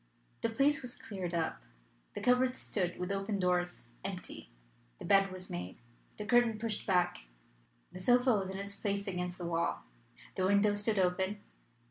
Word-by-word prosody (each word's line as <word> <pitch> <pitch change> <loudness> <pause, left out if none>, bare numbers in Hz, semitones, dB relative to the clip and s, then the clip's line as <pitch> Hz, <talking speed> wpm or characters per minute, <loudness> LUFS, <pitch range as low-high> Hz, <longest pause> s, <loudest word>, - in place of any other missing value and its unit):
The 230 - +1
place 280 +6 +3
was 250 -1 -7
cleared 200 -9 -5
up; 165 -1 -1 0.5
the - - -3
cupboard 250 +1 +3
stood 180 -8 -1
with 180 +1 -3
open 200 +1 -1
doors, 180 -1 0 0.2
empty; - - -6 0.5
the - - -8
bed 195 -1 +5
was 185 0 -8
made; 90 +1 -5 0.4
the 210 - -4
curtain 240 -1 +4
pushed 215 -1 -3
back; 180 - +2 0.7
the 185 - -8
sofa 245 +5 +4
was 195 -3 0
in 190 - -4
its 200 0 -5
place 200 0 -2
against 180 -1 -3
the 175 - -5
wall; 170 0 0 0.5
the 185 0 +2
window 200 +1 +4
stood 205 +1 +1
open. 190 +2 +1
195 Hz, 165 wpm, -33 LUFS, 180-220 Hz, 0.7 s, bed